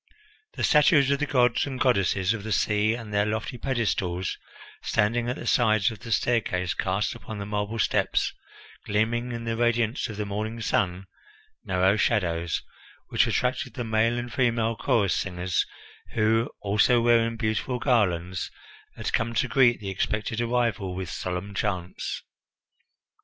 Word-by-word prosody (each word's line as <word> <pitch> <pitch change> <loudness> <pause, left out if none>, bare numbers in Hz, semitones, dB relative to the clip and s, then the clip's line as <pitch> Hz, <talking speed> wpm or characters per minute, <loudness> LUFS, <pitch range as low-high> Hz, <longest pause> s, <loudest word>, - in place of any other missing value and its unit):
The - - -4
statues 145 -2 +5
of 140 - +1
the 150 - -1
gods 125 -1 +2
and 130 -2 -5
goddesses 100 -5 +2
of 115 - -5
the 110 - -5
sea 105 +1 +2
and 115 -3 -8
their 105 0 +3
lofty 110 +3 -3
pedestals, 95 -9 -1 0.5
standing 115 +2 +1
at 125 - -1
the - - -8
sides 110 -3 +3
of 110 - -9
the 115 - -8
staircase, 95 -8 +1
cast 95 +2 -1
upon 110 -2 -8
the 100 - -5
marble 105 +2 -2
steps, - - +1 0.5
gleaming 115 +4 0
in 115 -1 -5
the 115 0 -2
radiance 120 +1 +1
of 105 - -7
the 105 - -2
morning 110 +3 -4
sun, 95 -4 0 0.6
narrow 95 +2 +2
shadows, 85 -7 0 0.5
which - - +3
attracted - - -1
the 120 - -3
male 115 +1 +1
and 120 -1 -5
female 115 -3 +1
chorus 100 -4 +1
singers, 90 -1 -1 0.5
who, 115 +2 +2
also 105 +4 +3
wearing 115 -1 +3
beautiful 110 +3 -1
garlands, 95 -9 0 0.5
had - - -4
come 115 +1 0
to 120 - +2
greet 120 -1 +4
the 100 -2 -4
expected 110 +3 -2
arrival 115 -6 0
with 90 -2 -5
solemn 90 +2 -4
chants. 95 -3 -3
110 Hz, 150 wpm, -26 LUFS, 100-120 Hz, 0.6 s, statues